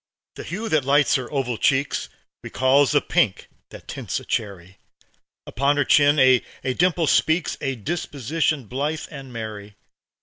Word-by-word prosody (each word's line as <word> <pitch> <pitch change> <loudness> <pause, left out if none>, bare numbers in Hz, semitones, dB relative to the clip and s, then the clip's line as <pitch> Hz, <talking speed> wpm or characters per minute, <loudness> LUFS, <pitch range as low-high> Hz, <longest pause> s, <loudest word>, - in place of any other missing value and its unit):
The - - -9
hue 215 +6 -5
that 155 -3 +2
lights 140 +1 +3
her 130 -2 -1
oval 125 -5 -2
cheeks 135 +1 0 0.3
Recalls 135 +1 +2
the - - +3
pink - - 0 0.2
that - - -13
tints - - -4
a - - -14
cherry; 95 -3 -4 0.7
Upon 140 +5 0
her 145 - +2
chin 145 +2 +4
a 130 -2 +5 0.3
dimple 175 +2 +1
speaks, 160 +2 +1
A 135 -2 -2
disposition 150 - -2
blithe 145 +7 -3
and 135 -4 -9
merry. 105 -3 -7
140 Hz, 145 wpm, -22 LUFS, 125-150 Hz, 0.7 s, a